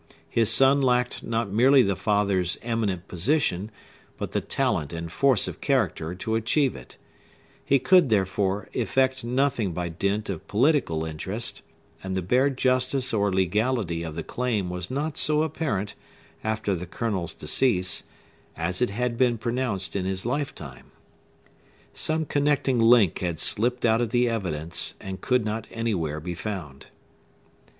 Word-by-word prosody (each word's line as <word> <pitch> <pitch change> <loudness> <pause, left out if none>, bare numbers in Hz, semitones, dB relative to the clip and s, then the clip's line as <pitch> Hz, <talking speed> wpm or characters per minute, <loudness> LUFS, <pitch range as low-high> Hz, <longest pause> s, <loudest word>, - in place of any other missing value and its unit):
His 115 -2 +3
son 135 +4 +5
lacked 125 -1 +1
not 115 -3 -2
merely 130 +5 +5
the 100 -1 0
father's 100 -4 0
eminent 110 -6 -2
position, 100 - 0 0.5
but - - -5
the - - -1
talent 75 0 -1
and 85 0 -5
force 135 -3 +3
of - - -7
character 80 +3 0
to 95 +5 -4
achieve 125 +5 +1
it: 65 - -12 0.7
he 140 - +3
could, 160 +3 +4
therefore, 95 -1 0
effect 130 +2 0
nothing 120 -5 0
by 90 0 -3
dint 100 +5 -2
of 95 -5 -6
political 110 - +1
interest; 95 +8 -1 0.4
and 95 0 -3
the 95 - -1
bare 125 +9 +3
justice 130 0 +1
or 100 -2 +1
legality 95 -1 0
of 80 -2 -6
the 85 - -4
claim 110 -6 -2
was 90 0 -4
not 145 +3 -3
so 150 +1 +4
apparent, 140 - -2 0.5
after 110 -2 -1
the 90 -1 -4
Colonel's 95 -5 -3
decease, 95 - +2 0.6
as 85 +5 0
it 125 - +2
had 120 +3 -2
been 125 -2 +3
pronounced 115 -5 -2
in 95 -2 -1
his 95 +1 -2
lifetime. 120 - -5 1.0
Some 160 0 +1
connecting 145 -4 +1
link 115 -5 +5
had 85 -4 -3
slipped 125 +3 +1
out 115 0 +3
of 120 - -1
the 120 +1 +2
evidence, 85 -8 -2
and 95 0 -7
could 125 -3 +1
not 110 0 -3
anywhere 90 -10 -2
be 90 +3 -5
found. 85 -8 -7
110 Hz, 150 wpm, -25 LUFS, 90-125 Hz, 1.0 s, son